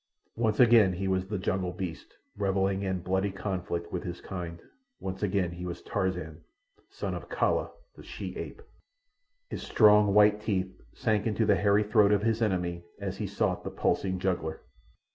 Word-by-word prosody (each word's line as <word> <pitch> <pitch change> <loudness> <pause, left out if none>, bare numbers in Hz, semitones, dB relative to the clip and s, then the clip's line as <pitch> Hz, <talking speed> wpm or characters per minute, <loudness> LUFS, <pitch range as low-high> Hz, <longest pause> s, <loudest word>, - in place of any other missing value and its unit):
Once 110 -2 0
again 115 -6 +6
he 95 +2 -3
was 95 0 0
the 105 +1 -2
jungle 95 -1 -1
beast 90 -3 -6 0.2
revelling 95 -1 0
in 95 -2 -2
bloody 95 +2 0
conflict 90 -3 -4
with 90 - -2
his 90 0 -6
kind. 85 -3 -6 0.4
Once 95 0 -5
again 95 -3 0
he 90 +1 -7
was 85 -1 -6
Tarzan, 90 -5 -2 0.5
son - - -4
of - - -7
Kala - - +1 0.3
the - - -12
she - - -7
ape. 445 - -7 0.9
His - - -4
strong, 105 -2 +5
white 105 0 +5
teeth 95 -3 -1 0.2
sank 110 -1 0
into 110 +1 +1
the 105 -1 +4
hairy 100 +3 +3
throat 105 -1 +4
of 105 0 +3
his 115 0 +1
enemy 90 -5 0 0.2
as - - -4
he - - -3
sought - - -1
the - - -4
pulsing 95 -1 0
jugular. 85 -4 -2
95 Hz, 170 wpm, -29 LUFS, 90-105 Hz, 0.9 s, again